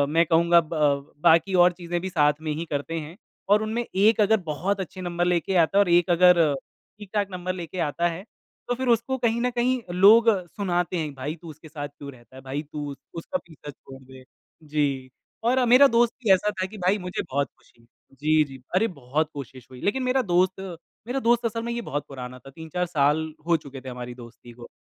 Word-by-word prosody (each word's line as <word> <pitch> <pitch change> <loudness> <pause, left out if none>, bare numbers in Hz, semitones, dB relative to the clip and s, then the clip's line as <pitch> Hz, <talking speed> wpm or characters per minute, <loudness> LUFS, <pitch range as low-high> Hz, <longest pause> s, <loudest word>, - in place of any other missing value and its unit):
मैं 170 - +5
कहूँगा 170 +1 +4
ब 150 -3 -1
बाकी 170 +4 +4
और 180 - +4
चीज़ें 175 0 -3
भी 190 - -4
साथ 150 -4 +3
में 155 - 0
ही 165 +3 -4
करते 155 +3 -2
हैं 165 +4 -11 0.4
और 210 +1 +3
उनमें 225 +2 -2 0.2
एक 220 0 +4
अगर 220 +2 +4
बहुत 195 +6 -1
अच्छे 185 0 -6
नंबर 175 0 -1
लेके 180 +1 0
आता 195 +5 0
है - - +7
और 180 - -4
एक 175 +1 +4
अगर 180 -2 +6 0.6
ठीक-ठाक 205 0 -2
नंबर 185 0 -3
लेके 170 +2 -7
आता 170 +4 0
है 190 - -10 0.4
तो 245 - 0
फ़िर 260 +1 -3
उसको 265 +4 -4
कहीं 235 -1 0
न 250 - +1
कहीं 250 0 +1 0.2
लोग 225 +3 +8 0.3
सुनाते 180 -3 -1
हैं 155 -3 -3
भाई 145 +5 -4
तू 165 - -10
उसके 155 +1 -12
साथ 145 -2 -5
क्यों 145 0 -11
रहता 125 0 -19
है 130 - -10
भाई 145 +2 -2
तू 145 -1 -5
उ - - -8 0.2
उसका 275 +11 -3
पीछा 155 -3 -12
छोड़ 135 0 -14
दे। 130 0 -14 0.4
जी, 140 -3 -1 0.3
और 250 +2 +2
मेरा 280 +2 +8
दोस्त 235 -1 +3
भी 205 - +3
ऐसा 210 +3 +1
था - - +1
कि 215 +2 -11
भाई 185 +2 +1
मुझे 180 -2 -4
बहुत 140 0 0
ख़ुशी 115 - -29
हुई 115 - -26 0.3
जी, 155 0 +4
जी। 135 -3 -11
अरे 220 +5 +3
बहुत 145 +4 -1
कोशिश 130 -3 -9
हुई 125 - -11
लेकिन 260 +6 0
मेरा 255 +1 +2
दोस्त 185 +2 +2 0.5
मेरा 265 +2 -1
दोस्त 240 0 +3
असल 230 0 -2
में 235 - -3
ये 235 0 -3
बहुत 145 0 -3
पुराना 125 -2 -8
था। 135 - -14
3-4 160 +4 -4
साल 155 -1 +1 0.2
हो 170 -1 +4
चुके 140 -3 -11
थे 130 - -8
हमारी 125 0 -7
दोस्ती 120 0 -13
को। 120 0 -12
170 Hz, 220 wpm, -25 LUFS, 145-200 Hz, 0.6 s, लोग